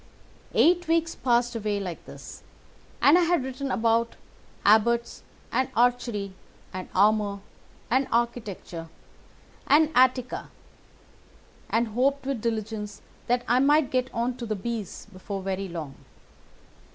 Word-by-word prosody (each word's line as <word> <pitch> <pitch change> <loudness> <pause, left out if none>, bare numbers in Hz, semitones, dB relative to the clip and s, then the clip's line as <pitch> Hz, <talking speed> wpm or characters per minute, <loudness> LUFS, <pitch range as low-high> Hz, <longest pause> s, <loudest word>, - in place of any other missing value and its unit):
"Eight 350 +1 +4
weeks 330 0 +1
passed 240 -1 +1
away 210 -2 -1
like 180 -4 -6
this, - - -10 0.6
and 305 +6 +7
I - - +3
had 345 -4 +2
written 265 +1 -4
about 230 0 +1 0.5
Abbots 230 +3 +3 0.3
and 260 0 +1
Archery 235 -5 +1 0.4
and 185 0 -6
Armour 205 0 +3 0.5
and 260 +2 +3
Architecture 215 -8 -2 0.8
and 305 +2 +5
Attica, 255 0 +2 1.2
and 230 0 +1
hoped 265 +5 +1
with 270 -5 -2
diligence 215 -2 -4 0.2
that 245 0 +1
I 245 +2 +4
might 290 +1 +3
get 255 0 0
on 240 +2 -2
to 240 -2 -6
the 215 - -1
B's 220 -1 -5
before 190 +1 -6
very 195 0 -2
long. 160 -5 -6
235 Hz, 125 wpm, -26 LUFS, 210-260 Hz, 1.2 s, and